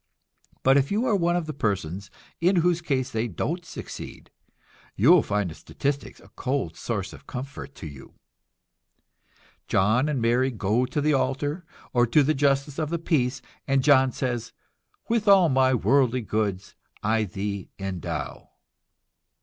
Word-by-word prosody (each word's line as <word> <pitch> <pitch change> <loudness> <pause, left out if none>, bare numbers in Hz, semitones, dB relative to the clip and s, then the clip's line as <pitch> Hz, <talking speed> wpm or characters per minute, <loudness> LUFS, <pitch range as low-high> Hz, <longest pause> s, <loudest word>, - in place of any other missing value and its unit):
But 135 +1 +5
if 140 0 +1
you 215 +5 +1
are 220 - +2
one 175 -2 +2
of 175 -2 -1
those 155 -2 -6
persons 100 - -2 0.3
in 180 +3 +3
whose 175 -1 +2
case 135 -6 -1
they 115 +1 -1
don't 165 - -3
succeed, - - -9 0.6
you 125 - +5
will 180 -3 +7
find 100 -4 -1
the - - -7
statistics 140 - -4
a - - -18
cold 130 - -2
source 95 -3 -4
of - - -14
comfort 135 +2 -7
to 95 - -9
you. 70 -3 -11 1.5
John 110 +9 +2
and 145 -4 0
Mary 120 +3 +2
go 115 +1 0
to 140 +4 -2
the 150 +1 +2
altar, 145 +5 -1 0.3
or 120 -1 +4
to 145 +6 +4
the 155 +3 +2
justice 140 +1 +1
of 155 -2 -1
the 170 - -1
peace, 130 -7 0 0.2
and 135 -1 +2
John 135 -2 +5
says: 120 -2 -3 0.5
"With 225 -2 0
all 195 -4 +7
my 130 -1 +3
worldly 125 +2 +2
goods 105 -3 -2 0.3
I 110 +1 +2
thee 100 0 -4
endow." 95 -3 -5
130 Hz, 160 wpm, -25 LUFS, 110-150 Hz, 1.5 s, will